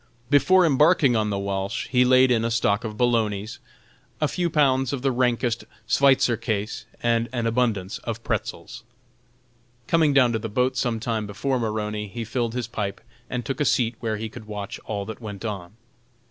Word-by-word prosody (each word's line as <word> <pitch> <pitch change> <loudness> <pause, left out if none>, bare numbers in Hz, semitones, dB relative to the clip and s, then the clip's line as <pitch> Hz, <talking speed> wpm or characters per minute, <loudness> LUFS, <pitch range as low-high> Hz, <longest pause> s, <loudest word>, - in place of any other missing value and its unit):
Before 180 +6 +5
embarking 150 -3 +4
on 110 -1 +1
the 100 - -1
Walsh 100 0 -3
he 125 -1 +4
laid 130 0 +5
in 115 -2 +2
a 115 - 0
stock 115 -2 +1
of 110 -2 -5
"bolognas," 110 -3 0 0.6
a 150 - +2
few 175 +3 -1
pounds 135 -4 +2
of 135 -2 -4
the 135 - +2
rankest 120 -2 0 0.2
"Sweitzer 135 -3 +4
kase" 110 -3 -3 0.2
and 115 0 +1
an 120 -2 -2
abundance 115 -5 0
of 115 0 -5
"pretzels." 115 - -4 1.0
Coming 160 -3 +3
down 130 -4 +4
to 110 - 0
the 115 +1 -5
boat 125 +4 +1
some 120 -3 -1
time 110 -2 -2
before 125 +6 -1
Maroney, 105 -2 -2
he 115 +3 -6
filled 115 0 -2
his 125 -2 -2
pipe 105 -4 -4 0.3
and 120 -2 -3
took 135 +5 -3
a - - +4
seat 120 -3 +2
where 110 -2 -2
he 110 +1 -4
could 110 0 -11
watch 105 -2 -6
all 100 -2 -3
that 110 +3 -8
went 105 -1 -7
on. 95 -4 -5
115 Hz, 185 wpm, -24 LUFS, 105-130 Hz, 1.0 s, Before